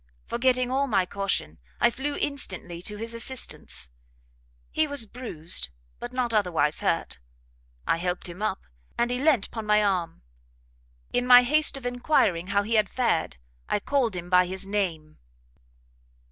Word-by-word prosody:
Forgetting 250 0 +1
all 275 +2 +1
my 195 -7 +2
caution, 195 - -2 0.2
I - - +4
flew 285 +4 -3
instantly 185 -11 -3
to 210 +3 -3
his 230 +2 -3
assistance; 230 - -1 0.8
he 315 0 +1
was 285 -5 -1
bruised, 170 - -3 0.3
but 240 - -6
not 250 -2 -1
otherwise 170 -8 +1
hurt; 170 - -1 0.7
I - - +2
helpt 180 +1 -2
him 175 +3 -9
up, 215 - -1 0.4
and 240 +1 +1
he 250 - -1
leant 280 -7 +2
'pon 225 -2 -6
my 210 0 +4
arm; 180 - -1 0.9
in 245 0 +1
my 250 0 +9
haste 300 +3 +3
of 265 - -10
enquiring 245 - +1
how 200 +1 +1
he 220 +3 -3
had 215 -3 +3
fared, 235 - 0 0.3
I - - +1
called 245 -3 0
him 175 -1 -5
by 180 0 +4
his 190 +1 -3
name. 175 -7 -3
210 Hz, 155 wpm, -26 LUFS, 180-250 Hz, 0.9 s, my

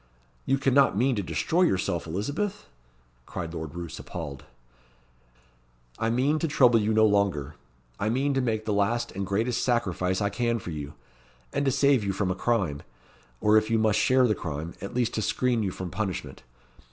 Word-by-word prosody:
"You 135 - +3
cannot 135 -4 +3
mean 130 +3 +2
to - - +1
destroy 85 - 0
yourself, 90 - +1
Elizabeth?" 145 - -3 0.6
cried 85 -2 -5
Lord 80 -2 -6
Roos, 85 -2 -6
appalled. 75 -6 -7 1.5
"I 115 - +1
mean 135 +6 +2
to 165 - 0
trouble 125 -6 +4
you 105 +1 +1
no 110 0 +5
longer. 100 -9 +1 0.5
I 105 - 0
mean 135 +5 +1
to 135 - +1
make 110 -3 -1
the 105 - 0
last 110 +4 0
and 95 0 -4
greatest 115 +5 0
sacrifice 95 -6 0
I 100 -1 +1
can 120 0 0
for 90 -5 -7
you; 75 -1 -6 0.6
and 140 - 0
to 135 - +3
save 135 -2 +3
you 100 -1 -1
from 95 -1 -1
a - - -1
crime 95 -10 0 0.6
or, 105 +1 +5
if 110 0 +1
you 115 - +2
must 110 -1 +2
share 130 0 +4
the 110 - +2
crime, 80 -2 -5
at 100 - -6
least 120 -2 +1
to 110 - -1
screen 115 +2 +1
you 100 - 0
from 90 -1 -6
punishment. 95 -1 -4
110 Hz, 185 wpm, -27 LUFS, 90-125 Hz, 1.5 s, no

